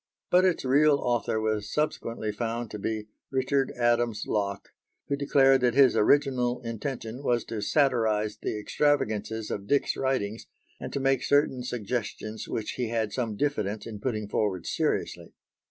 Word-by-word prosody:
But 180 +1 +5
its 180 -6 +1
real 145 +3 +5
author 120 -5 0
was 110 -1 -1
subsequently 115 -7 -2
found 115 +1 -3
to 105 - -6
be 110 +1 -3 0.2
Richard 135 0 +1
Adams 120 -2 +1
Locke, 100 -2 -2 0.4
who 140 - 0
declared 135 -1 +4
that 125 -1 +2
his 135 -2 +6
original 125 0 +3
intention 115 +1 -5
was 120 -4 0
to 110 -2 -4
satirise 110 -4 +2
the - - -2
extravagances 110 -4 0
of 100 0 -4
Dick's 140 +4 +2
writings, 115 -5 -2 0.3
and - - -6
to - - -2
make 135 -1 +2
certain 145 -3 +2
suggestions 110 -2 -4
which 110 - -3
he 125 -2 -1
had 110 -3 -1
some 115 -5 -2
diffidence 110 -6 -1
in 110 -3 -7
putting 110 -3 -2
forward 100 -4 -1
seriously. - - -2
120 Hz, 155 wpm, -27 LUFS, 110-135 Hz, 0.4 s, his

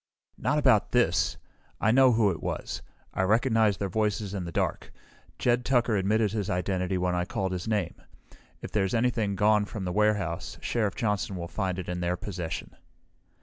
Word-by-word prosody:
"Not 150 - +1
about 130 -8 +3
this! 120 -9 +2 0.4
I 110 - +3
know 130 0 +6
who 110 -3 +3
it 85 - -6
was. - - -4 0.3
I - - 0
recognized 110 0 +3
their 100 - -1
voices 105 0 -1
in 95 -3 -3
the 85 - -6
dark. - - -2 0.5
Jed 120 0 +2
Tucker 120 -3 +2
admitted 105 +2 +2
his 105 -2 -2
identity 90 0 -1
when 90 0 0
I 90 0 +1
called 95 0 -2
his 90 +2 -4
name. 105 -6 0 0.7
If - - -6
there's 95 0 +1
anything 115 -4 +1
gone 105 +1 +3
from 100 -1 -6
the 90 - -2
warehouse, 105 -5 0
Sheriff 105 -5 -1
Johnson 105 -5 -1
will 85 -1 -5
find 95 -1 -2
it 90 - -5
in 90 0 -3
their 90 +1 -1
possession." 90 -5 -5
100 Hz, 180 wpm, -28 LUFS, 90-110 Hz, 0.7 s, know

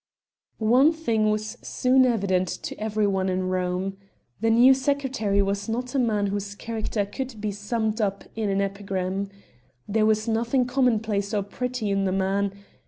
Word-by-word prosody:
One 250 +7 +5
thing 230 -10 +1
was 215 +2 -2
soon 255 +1 +2
very 250 -2 +4
evident 185 -3 +1 0.2
to - - -4
every 215 0 0
one 190 -1 +1
in 185 0 -1
Rome: 185 +1 -1 0.4
The 225 +2 +1
new 240 +4 +7
secretary 265 -7 0
was 200 +2 -2
not 245 +2 -3
a 275 - +1
man 215 -4 +1
whose 200 0 -3
character 220 -1 -2
could 245 +2 -6
be 210 0 -2
summed 215 +2 -2
up 200 -1 -1
in 220 -2 -1
an 195 0 +1
epigram. 195 -1 -2 0.6
There 215 +1 +2
was 215 +1 +1
nothing 235 +3 +1
commonplace 225 -5 +1
or 205 - +1
pretty 245 +1 -3
in 195 0 +1
the 190 - +1
man. 195 +1 0
215 Hz, 170 wpm, -25 LUFS, 200-235 Hz, 0.6 s, new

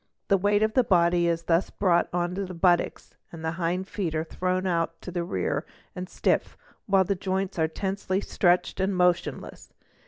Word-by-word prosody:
The 195 - +5
weight 205 +2 +2
of 220 0 +1
the 255 - +4
body 175 -3 +3
is 165 0 0
thus 170 +2 +1
brought 175 -4 +2
on 175 0 -1
to 200 +2 -2
the 185 -1 -7
buttocks, 175 0 +1 0.2
the 160 -1 -4
hind 175 +2 -2
feet 175 -7 -3
are 155 - 0
thrown 185 +3 -2
out 165 -2 -1
to 180 - -6
the 175 -1 -2
rear 95 - -2 0.3
and 180 0 -6
stiff, - - 0 0.3
while 195 -1 +4
the 195 +2 0
joints 190 0 -2
are 160 - +3
tensely 190 +2 -2
stretched 180 -2 +1
and 190 +1 0
motionless. 180 -1 -1
180 Hz, 185 wpm, -26 LUFS, 170-190 Hz, 0.3 s, The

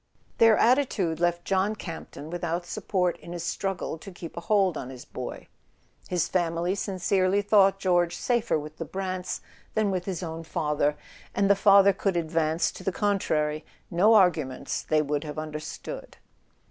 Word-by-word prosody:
Their 225 -2 +7
attitude 225 - +2
left 175 0 0
John 195 +2 +1
Camp 165 -5 -7
ton 155 +3 -9
without 175 0 -2
support 180 0 -1
in 170 - -9
his 175 - -5
struggle 195 -4 -3
to 195 - -10
keep 175 -2 -9
a - - -3
hold 195 -2 +2
on 130 - -5
his 130 -2 -10
boy. - - -7 0.6
His 180 -2 0
family 175 0 0
sincerely 190 0 +1
thought 195 -1 +5
George 175 -3 +2
safer 235 -6 +1
with 150 +1 -8
the - - -3
Brants 185 -1 -4 0.3
than 215 -2 +2
with 180 -2 -2
his 185 -2 -3
own 165 -1 -5
father, 150 -2 0 0.4
and 200 0 +3
the - - +6
father 200 0 +6
could 195 -1 -1
advance 160 0 +1
to - - -11
the 190 - 0
contrary 155 -7 0 0.3
no 200 +6 +5
arguments 155 -9 +2
they 155 -1 +1
would 145 0 -1
have 150 -1 -6
under¬ 155 -1 -5
stood. - - -8
180 Hz, 170 wpm, -27 LUFS, 160-195 Hz, 0.6 s, Their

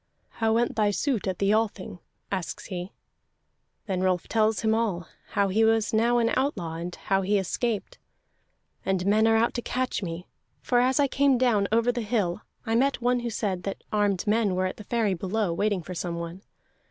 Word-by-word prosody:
"How 225 -1 +2
went 240 +2 +1
thy 210 -1 +3
suit 225 +1 -1
at 185 -2 -1
the 200 +1 +2
Althing?" 210 -5 -1 0.3
asks 190 -3 -4
he. 180 0 -5 0.9
Then 190 -4 -2
Rolf 185 -2 +1
tells 220 -1 +2
him 220 -1 +2
all, 205 -7 -1 0.3
how 200 -1 +2
he 215 +4 +2
was 225 0 +2
now 235 +2 +3
an 230 -1 +2
outlaw, 210 - -1
and 175 +1 -5
how 195 0 0
he 200 +2 +2
escaped. 210 +3 -2 0.8
"And 190 -1 0
men 215 +2 +4
are 225 0 +4
out 230 +1 +2
to 240 - -2
catch 255 0 -2
me, 175 -1 -5 0.3
for 245 - +1
as 255 +2 +2
I 285 - +4
came 275 -1 +3
down 230 -6 +2
over 230 +2 +3
the 245 0 -3
hill, 210 -4 -1 0.2
I 225 - -1
met 270 +4 +2
one 245 +1 +2
who 240 0 -3
said 200 -5 -2
that 195 - -5
armed 205 -3 +1
men 210 -3 +2
were 185 0 +1
at 185 - -3
the 210 - -9
ferry 225 -4 +1
below, 190 +1 -1
waiting 200 0 0
for 180 - -7
someone. 170 +1 -4
210 Hz, 195 wpm, -26 LUFS, 185-230 Hz, 0.9 s, men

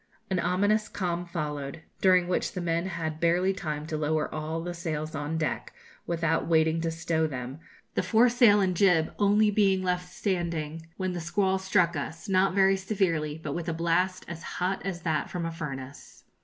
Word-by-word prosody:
An 185 - +1
ominous 205 +5 +1
calm 175 -2 -2
followed, 150 -2 -4 0.2
during 185 -2 +5
which 180 - -1
the - - -4
men 170 +1 0
had 160 -3 -4
barely 175 +3 +2
time 150 -4 -4
to 155 - -4
lower 155 0 0
all 155 +1 -3
the 175 +1 -4
sails 155 -2 -4
on 150 +1 -3
deck, 155 -4 -2 0.3
without 165 -1 0
waiting 160 0 +3
to 165 - 0
stow 160 -1 0
them, 130 0 -6 0.3
the - - +1
foresail 235 -2 +5
and 185 -2 +1
jib 175 -4 +3
only 210 +1 +4
being 195 -2 +3
left 180 -1 -1
standing, 165 -4 -2
when 185 -1 -2
the 175 - -4
squall 190 +3 +1
struck 180 -3 +2
us, 160 +2 -5
not 190 -1 +2
very 195 0 +4
severely, 170 -6 -1
but 145 - -3
with 170 +1 -3
a - - -1
blast 175 +3 0
as 170 -1 -7 0.2
hot 185 +2 -1
as 180 -3 -4
that 155 -2 0
from 175 -2 -3
a 165 - -2
furnace. 140 -4 -8
170 Hz, 180 wpm, -28 LUFS, 160-190 Hz, 0.3 s, during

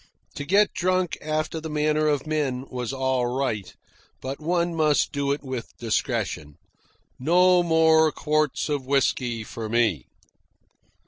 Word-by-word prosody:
To 145 - -6
get 200 +6 +3
drunk 185 -1 0
after 155 +1 -2
the 160 - -6
manner 155 0 +1
of 145 -2 0
men 140 -5 -2
was 125 -2 -3
all 130 -2 0
right, 120 -5 -2 0.5
but 135 +1 -5
one 170 +2 0
must 155 -3 +2
do 140 -1 -1
it 145 - -2
with 130 -3 -6
discretion. 105 -9 -2 0.6
No 180 +6 +4
more 160 -2 +4
quarts 155 -1 0
of 145 -3 -2
whisky 125 -4 0
for 110 0 -7
me. 110 - +1
145 Hz, 135 wpm, -24 LUFS, 125-160 Hz, 0.6 s, No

